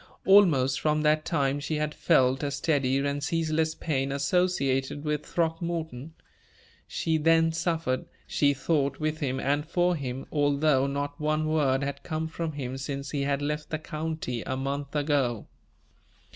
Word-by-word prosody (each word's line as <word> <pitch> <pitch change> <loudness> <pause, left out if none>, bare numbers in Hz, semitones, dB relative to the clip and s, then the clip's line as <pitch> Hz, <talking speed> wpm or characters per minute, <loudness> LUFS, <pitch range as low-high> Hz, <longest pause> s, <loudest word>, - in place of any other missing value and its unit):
Almost 155 -10 +5
from 150 0 +1
that 155 0 +2
time 140 -3 0
she 145 +2 -3
had 150 0 -1
felt 130 -5 +3
a 145 - -1
steady 140 -2 +1
and 140 +1 -1
ceaseless 160 0 0
pain 135 -4 -1
associated 140 -2 0
with 150 -1 -1
Throckmorton. 165 -3 -3 0.7
She 160 -1 0
then 165 +1 +4
suffered, 165 -5 -1 0.2
she 145 -1 +2
thought, 140 -1 0
with 155 0 -1
him, 130 -3 -1
and 145 +1 0
for 175 +3 +1
him, 130 -3 -5
although 145 -2 +2
not 145 +1 -3
one 155 +1 +1
word 145 -4 +2
had 140 0 -4
come 160 0 -3
from 160 0 -4
him 135 -2 -5
since 140 0 -4
he 145 - -1
had 140 0 0
left 150 +1 -3
the 155 - -1
county, 155 -6 -4
a 130 - -3
month 140 +2 -3
ago. 140 -6 0
145 Hz, 155 wpm, -27 LUFS, 140-160 Hz, 0.7 s, Almost